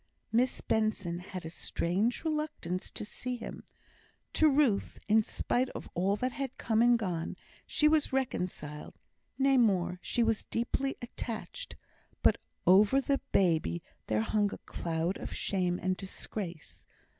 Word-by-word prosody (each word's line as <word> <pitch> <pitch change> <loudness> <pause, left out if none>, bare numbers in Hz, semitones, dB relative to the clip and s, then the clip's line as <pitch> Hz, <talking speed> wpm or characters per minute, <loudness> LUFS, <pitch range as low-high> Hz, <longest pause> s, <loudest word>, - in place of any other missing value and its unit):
Miss 250 +3 +2
Benson 205 -6 0
had 185 -1 -7
a - - -4
strange 200 - -1
reluctance 300 - -2
to - - -6
see 250 +4 -4
him. 230 - -7 0.7
To 315 - +5
Ruth, 270 -8 +2
in 220 +1 +6
spite 250 +3 0
of - - -6
all 190 +3 +2
that 255 +5 -1
had 270 0 -4
come 220 -1 +2
and 240 0 +6
gone, 175 -7 -3 0.3
she 300 - +3
was 305 -1 +3
reconciled 180 - -3 0.4
nay, 270 0 +4
more, 185 -6 +3
she 240 - +1
was 225 -1 +1
deeply 270 +4 -1
attached; 240 - -5 0.5
but - - +5 0.3
over 205 +8 +6
the 275 0 +1
baby 160 - +2 0.2
there 110 0 +2
hung 205 - +1
a - - -5
cloud 165 +2 -2
of - - -6
shame 180 -3 0
and 185 +1 0
disgrace. 190 -3 -6
215 Hz, 145 wpm, -31 LUFS, 180-255 Hz, 0.7 s, in